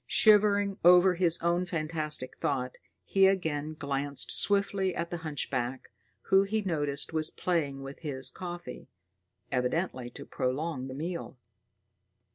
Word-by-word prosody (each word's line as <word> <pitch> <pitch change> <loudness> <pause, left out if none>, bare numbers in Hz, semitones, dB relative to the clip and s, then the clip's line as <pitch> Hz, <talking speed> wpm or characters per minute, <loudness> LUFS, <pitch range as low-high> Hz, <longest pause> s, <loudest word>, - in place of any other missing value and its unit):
Shivering 205 -2 +4
over 180 +2 +7
his 170 -2 +2
own 175 +1 +1
fantastic 155 -5 -2
thought, 135 -5 -2 0.3
he 195 -1 +4
again 155 -5 -1
glanced 140 0 -1
swiftly 200 -2 +3
at 170 0 -4
the 175 - -3
hunchback, 135 -5 -3 0.3
who 195 0 +4
he 210 +2 -1
noticed 145 -5 -2
was 155 0 +1
playing 145 -6 -2
with 135 +1 -9
his 130 -5 -1
coffee, 175 +1 -8 0.6
evidently 125 0 -1
to - - -11
prolong 130 +1 -3
the 130 - -7
meal. 165 -2 -5
160 Hz, 125 wpm, -29 LUFS, 140-185 Hz, 0.6 s, over